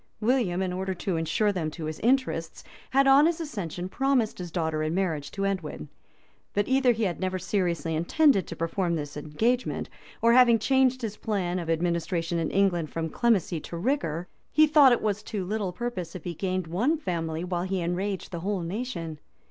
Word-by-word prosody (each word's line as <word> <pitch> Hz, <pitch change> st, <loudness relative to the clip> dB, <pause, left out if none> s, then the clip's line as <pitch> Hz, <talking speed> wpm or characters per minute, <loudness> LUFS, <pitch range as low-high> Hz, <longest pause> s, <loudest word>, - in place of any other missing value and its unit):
William, 215 Hz, -6 st, +1 dB
in 185 Hz, -1 st, -2 dB
order 190 Hz, +1 st, -2 dB
to 180 Hz, +1 st, -2 dB
insure 165 Hz, +6 st, +1 dB
them 175 Hz, -5 st, -2 dB
to 155 Hz, +1 st, -7 dB
his 155 Hz, 0 st, -5 dB
interests, 240 Hz, -10 st, 0 dB, 0.3 s
had 275 Hz, +1 st, +4 dB
on 275 Hz, +3 st, +7 dB
his 340 Hz, -1 st, -1 dB
accession 190 Hz, -, -4 dB
promised 260 Hz, -1 st, 0 dB
his 175 Hz, -1 st, -5 dB
daughter 160 Hz, -2 st, -1 dB
in 155 Hz, +2 st, -1 dB
marriage 165 Hz, -7 st, -1 dB
to 195 Hz, 0 st, -3 dB
Edwin; 165 Hz, -, -3 dB, 0.7 s
but 205 Hz, 0 st, +1 dB
either 265 Hz, -1 st, +4 dB
he 225 Hz, -1 st, -1 dB
had 180 Hz, -4 st, -1 dB
never 185 Hz, 0 st, -1 dB
seriously 170 Hz, -4 st, -1 dB
intended 195 Hz, -, +3 dB
to 170 Hz, -, -6 dB
perform 170 Hz, +1 st, -1 dB
this 145 Hz, -2 st, -5 dB
engagement, 220 Hz, +13 st, -1 dB, 0.3 s
or, 230 Hz, 0 st, +4 dB
having 240 Hz, -2 st, +7 dB
changed 260 Hz, +2 st, +2 dB
his 215 Hz, -2 st, -4 dB
plan 185 Hz, -4 st, -1 dB
of 170 Hz, -2 st, -5 dB
administration 170 Hz, 0 st, 0 dB
in 165 Hz, -, -1 dB
England 180 Hz, -5 st, +1 dB
from 165 Hz, -1 st, -3 dB
clemency 195 Hz, -5 st, +1 dB
to 170 Hz, -, -7 dB
rigor, 175 Hz, -, -1 dB, 0.2 s
he 310 Hz, -, +6 dB
thought 295 Hz, -3 st, +6 dB
it 240 Hz, -, +2 dB
was 210 Hz, -1 st, 0 dB
to 205 Hz, -4 st, -4 dB
little 205 Hz, -1 st, -2 dB
purpose 185 Hz, -5 st, -5 dB
if 185 Hz, -, -7 dB
he 175 Hz, -, -4 dB
gained 185 Hz, +1 st, -2 dB
one 225 Hz, -, +1 dB
family, 165 Hz, -, -3 dB
while 180 Hz, -1 st, -2 dB
he 190 Hz, +1 st, -1 dB
enraged 185 Hz, +3 st, -2 dB
the 170 Hz, -, -4 dB
whole 195 Hz, +2 st, -2 dB
nation. 170 Hz, -, -4 dB
185 Hz, 190 wpm, -27 LUFS, 165-230 Hz, 0.7 s, on